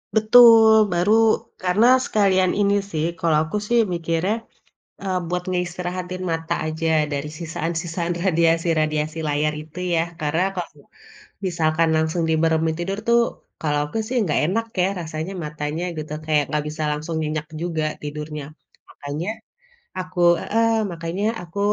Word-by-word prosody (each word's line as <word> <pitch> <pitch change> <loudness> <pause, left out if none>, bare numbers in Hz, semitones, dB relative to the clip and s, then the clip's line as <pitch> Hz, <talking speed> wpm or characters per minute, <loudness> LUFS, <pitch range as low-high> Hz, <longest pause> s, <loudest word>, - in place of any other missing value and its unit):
Betul, 220 -1 +7
baru, 175 +5 +2 0.5
karena 185 +6 +3 0.2
sekalian 190 -3 +2
ini 200 -1 +3 0.2
sih, 155 -1 -1
kalo 165 -2 +2
aku 185 +7 -3
sih 240 0 +4
mikirnya, 170 +4 0 0.7
eee, 190 -2 -1
buat 180 +1 -2
ngeistirahatin 180 0 -3
mata 165 0 -2
aja 160 +1 -2 0.3
dari 140 +1 -3
sisaan-sisaan 170 +1 -3
radiasi-radiasi 165 -3 +1
layar 150 +1 0
itu 160 +3 -11 0.2
ya, 165 - +2 0.2
karena 155 +4 +1
kalo 165 -5 -7 0.6
misalkan 165 -2 +1
langsung 160 +2 0
dimeremin 160 0 +2
tidur 190 +3 -2
tuh, 235 0 +5 0.4
kalau 150 -2 0
aku - - -3
sih 255 - -4
nggak 155 -7 +1
enak 225 +6 0 0.2
ya - - +3
rasanya 160 +2 -5
matanya 150 +2 -4
gitu, 155 -1 -6
kayak 150 -2 +2
nggak 150 -1 -1
bisa 155 +1 -4
langsung 155 +3 -4
nyenyak 155 0 -3
juga 165 -2 -2 0.2
tidurnya. 150 0 -6 0.5
Makanya 145 +6 -5 0.7
aku 180 -1 -4 0.2
heeh, 230 +1 +1 0.2
makanya 170 +4 -4 0.2
aku 175 +3 -9
165 Hz, 135 wpm, -22 LUFS, 155-185 Hz, 0.7 s, Betul